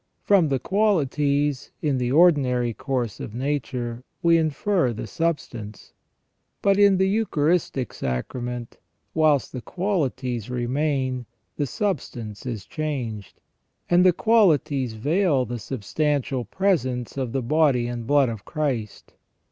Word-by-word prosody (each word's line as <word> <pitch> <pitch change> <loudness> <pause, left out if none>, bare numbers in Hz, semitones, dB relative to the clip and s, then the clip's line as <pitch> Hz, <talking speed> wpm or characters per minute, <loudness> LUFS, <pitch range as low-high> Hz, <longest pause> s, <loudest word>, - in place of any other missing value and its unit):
From 195 -5 +4
the 135 - +1
qualities, 145 - +1
in 140 -4 0
the 125 0 -1
ordinary 135 -7 +4
course 125 -4 -3
of 105 - -7
nature, 125 -3 -3 0.2
we 170 0 +5
infer 160 -2 +1
the 110 - -5
substance. 115 -6 -4 0.7
But 200 0 +4
in 200 -2 +6
the 190 +1 +3
Eucharistic 170 - 0
Sacrament, 120 - -4 0.3
whilst 155 -4 +2
the 125 - -6
qualities 130 - -2
remain, 130 0 -1 0.3
the 145 - -1
substance 120 - -3
is 115 -5 -4
changed, 125 - -4 0.5
and 175 +1 +6
the 185 - +7
qualities 160 - +2
veil 145 - +1
the 120 +1 -5
substantial 135 +3 -1
presence 130 - 0
of 130 -4 -2
the 135 0 -1
body 140 -2 +3
and 120 -1 -5
blood 145 -3 +4
of 110 -3 -6
Christ. 125 -9 -3
135 Hz, 125 wpm, -24 LUFS, 120-160 Hz, 0.7 s, the